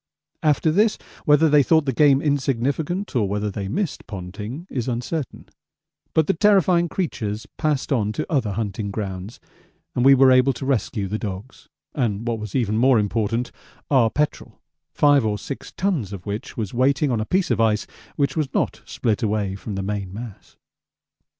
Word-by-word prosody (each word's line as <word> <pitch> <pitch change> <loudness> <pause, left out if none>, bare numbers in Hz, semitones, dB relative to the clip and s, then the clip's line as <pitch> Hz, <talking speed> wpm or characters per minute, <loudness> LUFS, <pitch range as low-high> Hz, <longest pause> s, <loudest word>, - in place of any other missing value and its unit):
After 155 +1 +2
this, 210 +5 +3 0.3
whether 150 +1 +5
they 150 -1 +5
thought 160 +2 +3
the 135 - 0
game 140 +1 +4
insignificant, 145 - -1
or 105 -5 +1
whether 105 +1 -1
they 100 0 -4
missed 175 - -3
Ponting 105 - -7
is 125 -8 -3
uncertain, 125 +4 -4 0.7
but 160 - +4
the 195 - +2
terrifying 180 -3 +3
creatures 110 - -3
passed 150 -3 0
on 105 -5 +1
to - - -3
other 125 -10 0
hunting 100 -1 -3
grounds, 100 0 -5 0.5
and 125 - 0
we 135 +1 +8
were 135 0 +6
able 130 +1 +5
to 130 - -6
rescue 120 -6 -1
the 105 +3 -3
dogs, 100 +4 -7 0.2
and 115 -4 -1
what 115 -2 -1
was 105 -2 -7
even 110 -4 +1
more 130 0 +5
important, 110 +3 0 0.4
our 125 -5 +5
petrol 150 +6 -2 0.3
5 145 -3 +4
or 105 -1 0
6 140 - -7
tons 170 - -1
of 95 -3 -8
which 105 +2 -5
was 110 -4 -3
waiting 135 +3 +2
on 115 -3 0
a - - -2
piece 185 +6 0
of - - +2
ice 110 -1 +2 0.3
which 140 -2 0
was 150 -4 -1
not 110 - 0
split 110 +2 -1
away 105 -3 0
from 100 +1 -6
the 95 - -3
main 100 -2 -3
mass. 110 0 -10
120 Hz, 175 wpm, -22 LUFS, 105-145 Hz, 0.7 s, we